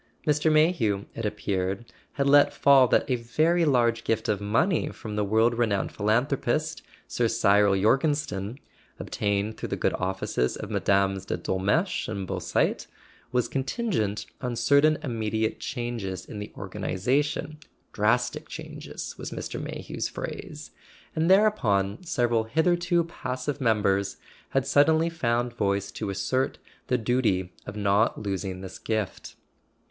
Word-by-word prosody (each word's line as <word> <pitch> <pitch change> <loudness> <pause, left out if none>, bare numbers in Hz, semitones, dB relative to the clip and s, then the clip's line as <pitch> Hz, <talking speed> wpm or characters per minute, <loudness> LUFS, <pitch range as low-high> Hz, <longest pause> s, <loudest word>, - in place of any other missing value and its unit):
Mr. 150 +1 +2
Mayhew, 150 - +2
it 115 -2 -2
appeared, 100 +1 -3 0.2
had 140 -1 0
let 145 +1 +5
fall 135 -2 +6
that - - +2
a 130 -3 +1
very 155 +9 +2
large 120 -5 +2
gift 110 -1 -1
of 105 -1 0
money 150 - +1
from 110 -4 -7
the 105 - +1
world 110 +4 +3
renowned 110 -5 0
philanthropist. 130 +8 0 0.3
Sir 120 - +1
Cyril 100 -3 +3
Jorgenstein 130 -2 +1 0.4
(obtained 100 +1 -1
through - - -5
the - - -1
good - - 0
offices 90 -9 -1
of - - -7
Mmes. 95 -1 +1
de - - -1
Dolmetsch 100 - 0
and 100 -3 -4
Beausite) - - -1 0.4
was 125 -1 +1
contingent 135 - -1 0.2
on 125 -2 -2
certain 145 +5 +4
immediate 110 -3 -1
changes 115 -8 -4
in 105 - -8
the 105 - -7
organization 145 +8 -1 0.3
("drastic 120 +4 +1
changes" - - -7
was - - -5
Mr. - - -5
Mayhew's - - -4
phrase); - - -7 0.4
and 160 +2 +1
thereupon 125 - +3
several 120 -8 +1
hitherto 175 +6 +2
passive 135 -3 -4
members 100 -4 +1 0.3
had - - +1
sud¬ 145 0 +4
denly 160 +1 +2
found 120 -6 0
voice 100 -3 -1
to 105 0 -4
assert 130 +7 -1 0.3
the 125 - +2
duty 110 -6 0
of 105 - -6
not 105 +2 +2
losing 95 -2 -3
this 95 -1 -8
gift. 110 -4 -3
115 Hz, 135 wpm, -26 LUFS, 100-140 Hz, 0.4 s, fall